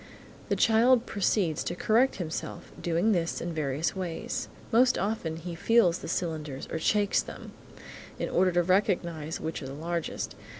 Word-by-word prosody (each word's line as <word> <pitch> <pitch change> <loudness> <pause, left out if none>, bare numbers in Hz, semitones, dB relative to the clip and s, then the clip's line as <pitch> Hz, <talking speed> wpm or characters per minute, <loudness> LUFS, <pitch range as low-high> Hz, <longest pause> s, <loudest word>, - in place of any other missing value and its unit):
The - - +2
child 235 +2 +4
proceeds 190 -5 0
to 175 - -3
correct 230 +8 +3
himself, 165 -3 -5
doing 175 +6 +2
this 170 -4 0
in 170 0 -4
various 155 +2 -1
ways. 180 -3 -4 0.2
Most 245 +2 +5
often 195 -5 -2
he 170 +2 -6
feels 180 -1 +3
the - - -7
cylinders 155 -5 -3
or 160 - -2
shakes 205 +4 +2
them, - - -9 0.7
in - - -2
order 185 +1 +3
to 175 0 +3
recognise 170 -4 0
which 160 +1 -4
are 135 - -6
the 135 - -7
largest. 170 +2 -3
175 Hz, 160 wpm, -28 LUFS, 160-205 Hz, 0.7 s, Most